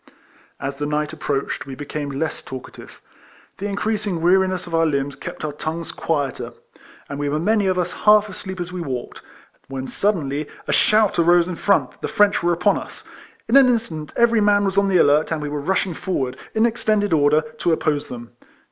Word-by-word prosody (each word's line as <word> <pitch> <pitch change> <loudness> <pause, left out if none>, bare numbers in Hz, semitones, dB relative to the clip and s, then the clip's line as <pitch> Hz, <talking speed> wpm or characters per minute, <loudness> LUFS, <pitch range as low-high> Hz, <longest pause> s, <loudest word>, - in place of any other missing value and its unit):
As 135 0 -4
the 145 +1 -2
night 150 +1 -1
approached 140 -3 -3
we 135 - -6
became 145 +1 -5
less 145 +3 -3
talkative. 130 -1 -10 0.6
The 200 - -2
increasing 205 -2 -2
weariness 185 +1 +2
of 175 - -10
our 165 0 +3
limbs 140 -2 -1
kept 140 - -7
our 150 - -2
tongues 160 +3 -5
quieter, 145 -5 -2 0.5
and 140 - -6
we 145 0 -1
were 150 - 0
many 205 +4 +2
of 185 -1 +1
us 180 - 0
half 210 0 +4
asleep 190 -1 -7
as 175 0 -4
we 180 -1 -5
walked, 130 -6 -5 0.5
when 135 -1 -5
suddenly 155 -8 -1 0.2
a - - 0
shout 215 -4 +3
arose 175 +1 +4
in 180 - -4
front 200 +3 +2
that - - -25
the - - -2
French 205 -1 +3
were 175 - +2
upon 180 +4 +2
us. - - -11 0.4
In 230 - +2
an 270 -2 +7
instant 175 -11 -2
every 235 -2 +4
man 205 0 +3
was 195 -1 -1
on 200 0 +3
the 185 - +4
alert, 150 0 +4
and 160 - 0
we 150 -1 -4
were 145 0 -3
rushing 185 +3 0
forward, 145 -9 -2 0.2
in 220 +1 +4
extended 215 -4 +1
order, 150 0 +4 0.2
to 170 - +1
oppose 150 -2 0
them. 120 -1 -9
170 Hz, 200 wpm, -21 LUFS, 145-200 Hz, 0.6 s, an